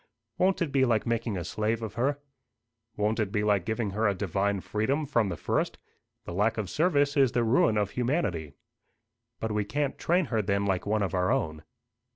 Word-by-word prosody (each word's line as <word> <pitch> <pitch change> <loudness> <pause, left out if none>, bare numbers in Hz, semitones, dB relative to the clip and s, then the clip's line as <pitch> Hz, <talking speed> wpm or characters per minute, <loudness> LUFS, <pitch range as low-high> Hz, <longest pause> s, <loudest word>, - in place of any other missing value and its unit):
"Won't 185 -1 +3
it 155 - -4
be 135 -1 +3
like 115 -4 +2
making 115 -3 -1
a 90 - -3
slave 110 +6 -1
of 110 -2 -5
her?" 135 +5 0 0.8
"Won't 105 +2 0
it 105 -3 0
be 105 -1 0
like 100 -4 +2
giving 110 -2 -1
her 110 +3 +1
a 100 - +1
divine 100 +1 0
freedom 135 +11 -1
from 115 -7 +1
the 85 - -4
first? - - -1 0.5
The - - -6
lack 105 +5 +1
of 105 -5 -3
service 145 -4 +2
is 135 -4 +4
the 120 - +2
ruin 110 -1 +3
of 105 -2 0
humanity." 120 - -1 0.9
"But 110 - -2
we 105 0 0
can't 140 +6 -2
train 175 +1 +2
her 110 - +3
then 100 0 0
like 95 -1 -1
one 105 0 +1
of 95 - -2
our 90 0 +1
own." 80 -1 -1
110 Hz, 200 wpm, -28 LUFS, 100-125 Hz, 0.9 s, is